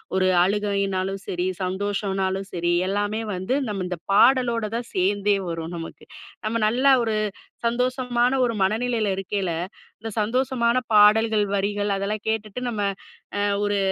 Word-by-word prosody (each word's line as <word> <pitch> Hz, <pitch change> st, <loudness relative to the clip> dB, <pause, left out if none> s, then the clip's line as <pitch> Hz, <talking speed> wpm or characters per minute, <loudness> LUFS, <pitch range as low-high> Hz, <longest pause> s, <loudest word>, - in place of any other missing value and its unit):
ஒரு 185 Hz, 0 st, +3 dB
அழுகைன்னாலும் 195 Hz, -1 st, -1 dB
சரி, 180 Hz, 0 st, -1 dB, 0.2 s
சந்தோஷம்னாலும் 195 Hz, 0 st, -2 dB
சரி, 175 Hz, 0 st, 0 dB, 0.2 s
எல்லாமே 205 Hz, +2 st, -1 dB
வந்து 185 Hz, +7 st, -2 dB, 0.2 s
நம் 195 Hz, -3 st, -3 dB
இந்த 180 Hz, -1 st, -4 dB, 0.2 s
பாடலோடதான் 235 Hz, -1 st, +3 dB
சேர்ந்தே 200 Hz, +2 st, +2 dB
வரும் 165 Hz, +1 st, -5 dB
நமக்கு. 165 Hz, 0 st, -8 dB, 0.4 s
நம்ம 215 Hz, +2 st, -1 dB
நல்ல 250 Hz, +5 st, -1 dB, 0.2 s
ஒரு 220 Hz, -2 st, 0 dB, 0.5 s
சந்தோஷமான 250 Hz, +1 st, +1 dB
ஒரு 240 Hz, -2 st, +1 dB
மனநிலைல 220 Hz, +2 st, +1 dB
இருக்கைல, 195 Hz, -1 st, -2 dB, 0.5 s
இந்த 225 Hz, +2 st, -6 dB
சந்தோஷமான 240 Hz, +1 st, +1 dB, 0.2 s
பாடல்கள், 215 Hz, +1 st, +5 dB
வரிகள், 205 Hz, +1 st, 0 dB
அதெல்லாம் 200 Hz, +2 st, -3 dB
கேட்டுட்டு, 220 Hz, 0 st, -2 dB
நம்ம 215 Hz, -3 st, -3 dB, 0.6 s
அ -, -, 0 dB, 0.2 s
ஒரு 205 Hz, 0 st, +1 dB
205 Hz, 125 wpm, -24 LUFS, 195-230 Hz, 0.6 s, பாடல்கள்